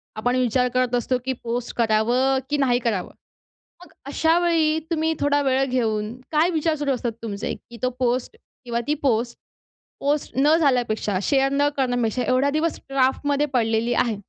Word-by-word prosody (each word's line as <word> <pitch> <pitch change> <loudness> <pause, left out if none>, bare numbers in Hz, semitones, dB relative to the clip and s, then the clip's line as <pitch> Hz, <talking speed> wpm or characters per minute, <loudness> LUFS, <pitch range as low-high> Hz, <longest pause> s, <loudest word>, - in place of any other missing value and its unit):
आपण 245 +3 0
विचार 250 0 +2
करत 255 -1 +1
असतो, 245 +1 0
की 260 - 0
पोस्ट 240 +1 -3
करावं 240 +4 +2
की 295 - +1
नाही 250 -3 +2
करावं? 220 -7 -2 0.7
मग 320 - -20
अशावेळी 320 +1 +2
तुम्ही 320 -1 +1
थोडा 290 0 +2
वेळ 265 -1 +2
घेऊन, 225 -4 -1 0.2
काय 315 +3 +3
विचार 320 -1 0
सुरू 290 -2 -1
असतात 240 -2 -3
तुमचे? 210 -2 -4
की 235 - -14
तो 255 - +1
पोस्ट 250 - -1 0.3
किंवा 235 -1 -2
ती 300 - +1
पोस्ट, 235 -3 0 0.6
पोस्ट 290 +1 -1
न 295 +4 +5
झाल्यापेक्षा, 240 - +1
शेअर 270 +2 +2
न 285 +1 +3
करण्यापेक्षा, 245 -2 0
एवढा 255 +2 +2
दिवस 310 +3 -1
ड्राफ्टमध्ये 275 +2 +1
पडलेली 230 -1 +1
आहे. 240 -2 +1
255 Hz, 160 wpm, -23 LUFS, 235-285 Hz, 0.7 s, न